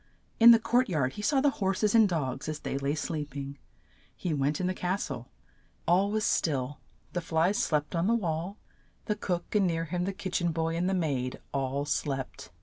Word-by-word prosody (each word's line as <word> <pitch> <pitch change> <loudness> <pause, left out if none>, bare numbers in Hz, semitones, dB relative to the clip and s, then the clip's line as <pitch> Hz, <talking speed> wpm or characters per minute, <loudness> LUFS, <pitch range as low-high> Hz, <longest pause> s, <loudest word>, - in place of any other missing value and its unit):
In 230 +1 +10
the 235 - +10
court 240 +2 +2
yard 140 -7 0
he - - -6
saw 270 +6 +2
the 285 0 +4
hor 195 0 +2
ses 210 +1 +1
and 220 -3 +6
dogs 145 -4 -2
as 155 - -3
they - - -3
lay 140 +2 0
sleep 150 -3 -4
ing. 140 0 -6 0.6
He 175 - -2
went 145 +1 0
in 185 - -1
the 185 - +1
cas 185 +2 -1
tle; 120 - -7 0.6
all 185 +4 +4
was 215 0 0
still, 140 -3 0 0.3
the 175 - -1
flies 165 +6 +1
slept 150 -7 0
on 170 +3 +1
the 230 - +4
wall, 175 -1 -2 0.5
the 210 - 0
cook, 180 -4 -3
and 205 -3 +3
near 165 -1 -1
him 175 +2 -2
the 195 - -1
kitch 190 -2 -2
en 175 -1 +1
boy, 165 0 -1
and 175 +2 0
the 190 - +1
maid, 135 -8 -1
all 135 +1 -1
slept. 135 -2 -3
170 Hz, 215 wpm, -29 LUFS, 145-195 Hz, 0.6 s, In